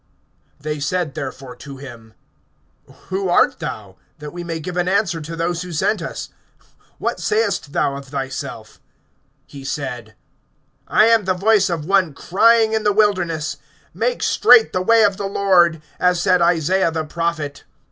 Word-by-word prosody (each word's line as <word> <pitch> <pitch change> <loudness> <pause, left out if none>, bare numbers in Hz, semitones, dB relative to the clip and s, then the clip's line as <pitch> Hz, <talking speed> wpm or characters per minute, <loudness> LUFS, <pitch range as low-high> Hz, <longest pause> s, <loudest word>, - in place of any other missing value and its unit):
(22)They 150 -1 -4
said 160 0 -1
therefore 130 -1 -7
to 140 -2 -11
him: 115 -5 -12 0.9
Who 190 0 -2
art 175 - +3
thou? - - -7 0.2
that 150 -1 -8
we 175 0 -6
may 165 -1 -4
give 175 +3 -6
an 180 0 0
answer 185 -4 0
to 165 +2 -7
those 165 0 -2
who 180 -1 -7
sent 175 +5 0
us. 165 - -6 0.7
What - - -3
sayest 430 - -1
thou 140 -1 0
of 140 0 -8
thyself? 135 -1 -6 0.7
(23)He 135 -1 -10
said: 120 -7 -5 0.7
I 215 - +4
am 225 -3 +3
the 185 -1 +1
voice 200 +1 +3
of 165 -4 -3
one 185 -5 +2
crying 225 +6 +3
in 220 - +1
the 210 - +3
wilderness: 180 -7 0 0.4
Make - - -1
straight 450 - +5
the 185 - 0
way 230 +4 +4
of 200 -2 +2
the 200 - -3
Lord, 175 -5 +2 0.2
as 180 -1 +2
said 180 0 +2
Isaiah 170 +2 +2
the 160 -1 -3
prophet. 160 -3 -3
170 Hz, 160 wpm, -20 LUFS, 150-195 Hz, 0.9 s, straight